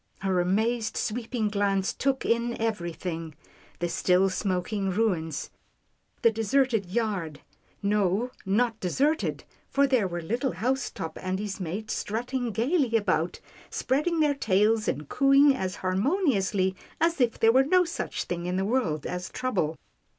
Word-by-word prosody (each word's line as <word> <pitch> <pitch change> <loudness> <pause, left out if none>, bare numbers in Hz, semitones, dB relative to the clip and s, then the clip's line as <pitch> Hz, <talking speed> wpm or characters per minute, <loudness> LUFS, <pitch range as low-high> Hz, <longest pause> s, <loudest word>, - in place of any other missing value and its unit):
Her 190 -2 +1
amazed, 220 +5 0
sweeping 230 0 -1
glance 200 -2 0
took 270 -1 -1
in 235 +1 0
everything 170 -6 -3 0.2
— - - -28
the 175 - +1
still 185 +2 +2
smoking 195 +1 -1
ruins, 180 -7 -1 0.7
the 230 - +6
de 225 0 -3
serted 225 -4 +1
yard 195 -9 -2 0.2
— - - -36
no, 205 +3 +1
not 225 +3 +1
deserted, 285 - 0 0.3
for 280 0 +3
there 255 -7 +2
were 175 -1 -4
lit 230 +9 -2
tle 265 - 0
Housetop 245 -9 -2
and 185 0 -2
his 205 -1 -4
mate, 195 +5 -4
strutting 245 +3 -2
gaily 240 - +1
about, 175 -5 0 0.3
spreading 310 +5 0
their 295 -1 +3
tails, 215 -3 +2
and 145 +1 -2
cooing 275 - +5
as 185 -7 -3
harmoniously 195 - +1 0.2
as 335 -3 +2
if 235 -2 +1
there 225 - +6
were 260 +3 +5
no 360 +6 +4
such 340 - -3
thing 175 0 -4
in 180 - -1
the 190 +1 0
world 200 - 0
as 180 0 -4
trouble. 185 -12 -1
215 Hz, 150 wpm, -27 LUFS, 185-250 Hz, 0.7 s, the